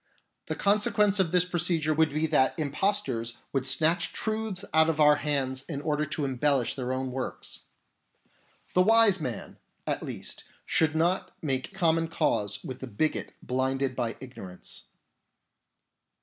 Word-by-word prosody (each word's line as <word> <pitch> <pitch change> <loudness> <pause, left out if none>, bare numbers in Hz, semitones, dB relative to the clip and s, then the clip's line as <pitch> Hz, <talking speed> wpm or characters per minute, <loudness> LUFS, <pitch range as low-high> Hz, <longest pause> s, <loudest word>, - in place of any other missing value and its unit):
The - - -2
consequence 205 0 +3
of 180 -4 +2
this 180 -1 +4
procedure 170 -3 +1
would 160 0 +3
be 155 +2 0
that 150 -3 +2
impostors 140 - -1 0.2
would 135 -1 0
snatch 160 +5 +2
truths 220 -3 -3
out 160 0 +5
of 160 -1 -1
our 150 -1 +6
hands 135 -3 0
in 145 -4 -3
order 150 0 -1
to 150 -1 -2
embellish 135 -1 +1
their 130 -2 -4
own 130 0 -2
works. 130 0 -5 1.1
The 180 - +5
wise 215 -2 +5
man, 125 -6 -5 0.3
at - - -1
least, - - -7 0.2
should 155 -1 +2
not 175 +4 0
make 135 +6 -2
common 165 -3 +2
cause 105 -11 -1
with 130 - -7
the 130 - -6
bigot 140 +8 -2
blinded 130 +1 -1
by 120 -2 -2
ignorance. 95 -8 -7
150 Hz, 145 wpm, -28 LUFS, 130-175 Hz, 1.1 s, our